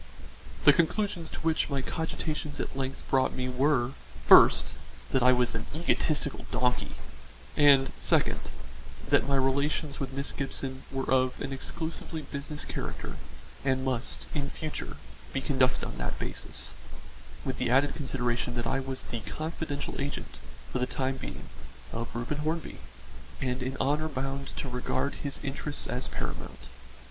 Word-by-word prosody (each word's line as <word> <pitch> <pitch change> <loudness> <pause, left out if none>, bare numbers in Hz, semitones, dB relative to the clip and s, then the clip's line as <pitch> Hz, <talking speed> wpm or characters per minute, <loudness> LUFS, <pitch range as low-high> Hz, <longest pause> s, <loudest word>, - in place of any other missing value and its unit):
The - - +10
conclusions 170 -1 +1
to - - -6
which 160 -1 +2
my 135 -2 0
cogitations 155 -2 -3
at - - -3
length 135 0 -3
brought 130 -1 +4
me 130 -1 -1
were: 130 -1 +3 0.3
first, - - +8 0.4
that 130 - +3
I 125 +1 +7
was 125 -1 +3
an 115 -1 -3
egotistical 155 -3 +1
donkey, 125 0 +1 0.6
and, 140 -2 +7
second, - - +3 0.7
that - - +4
my 140 - +3
relations 140 +2 +1
with 135 -1 -2
Miss 140 +1 -2
Gibson 135 -1 -3
were 135 -1 -2
of 130 -1 +3
an 135 - -3
exclusively 160 +3 -3
business 145 +1 -5
character - - -4 0.5
and 130 -1 +2
must 130 -2 -1
in 140 -1 -1
future 155 0 -5 0.4
be 135 - +1
conducted 135 -1 +2
on - - -6
that - - -2
basis, - - -4 0.7
with - - -1
the - - +1
added 135 +3 +4
consideration 125 -4 -1
that 120 0 -1
I 135 - +1
was 135 0 -4
the 120 - -4
confidential 155 +3 -4
agent, 140 +1 -4 0.4
for - - +1
the 125 - +1
time 135 0 -1
being, - - -7 0.5
of 115 +1 -3
Reuben 120 +5 -2
Hornby, 155 +1 -2 0.6
and 125 0 -1
in 130 +1 -2
honour 150 +3 +2
bound 135 0 -3
to - - -2
regard 125 +3 0
his 140 -1 -3
interests 145 +1 -2
as 125 +1 -3
paramount. - - -5
135 Hz, 150 wpm, -30 LUFS, 130-145 Hz, 0.7 s, The